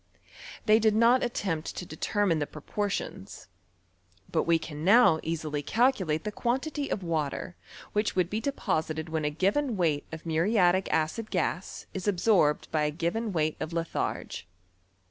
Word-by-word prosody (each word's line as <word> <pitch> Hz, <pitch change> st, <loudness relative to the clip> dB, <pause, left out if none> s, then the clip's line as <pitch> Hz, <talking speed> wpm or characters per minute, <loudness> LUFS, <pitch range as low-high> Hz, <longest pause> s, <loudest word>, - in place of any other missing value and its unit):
They 215 Hz, 0 st, +6 dB
did 220 Hz, -1 st, +3 dB
not 235 Hz, +3 st, +5 dB
attempt 185 Hz, -9 st, -2 dB
to 180 Hz, -, -5 dB
determine 175 Hz, +1 st, 0 dB
the 145 Hz, -, -1 dB
proportions; 195 Hz, +3 st, -4 dB, 0.8 s
but 160 Hz, -, +1 dB
we 170 Hz, 0 st, +4 dB
can 155 Hz, -1 st, -7 dB
now 200 Hz, -3 st, +6 dB
easily 155 Hz, -2 st, -3 dB
calculate 195 Hz, -, +1 dB
tlw 210 Hz, 0 st, -4 dB
quantity 280 Hz, +6 st, -1 dB
of 195 Hz, -, -2 dB
water 165 Hz, 0 st, -2 dB, 0.4 s
which 210 Hz, +1 st, 0 dB
would 180 Hz, -2 st, +2 dB
be 210 Hz, +4 st, -2 dB
deposited 160 Hz, -, -2 dB
when 160 Hz, -1 st, -1 dB
a -, -, +2 dB
^ven 210 Hz, -, +1 dB
weight 160 Hz, -6 st, 0 dB
of 160 Hz, +1 st, -8 dB
muriatic 180 Hz, +3 st, +2 dB
acid 160 Hz, +8 st, 0 dB
gas 180 Hz, 0 st, -2 dB
is 190 Hz, +1 st, -4 dB
absorbed 180 Hz, -6 st, +3 dB
by 155 Hz, -1 st, +1 dB
a -, -, +1 dB
given 175 Hz, +8 st, -2 dB
wei^t 155 Hz, -3 st, 0 dB
of 160 Hz, -, -4 dB
lithai^e. 165 Hz, 0 st, -3 dB
175 Hz, 150 wpm, -28 LUFS, 160-215 Hz, 0.8 s, They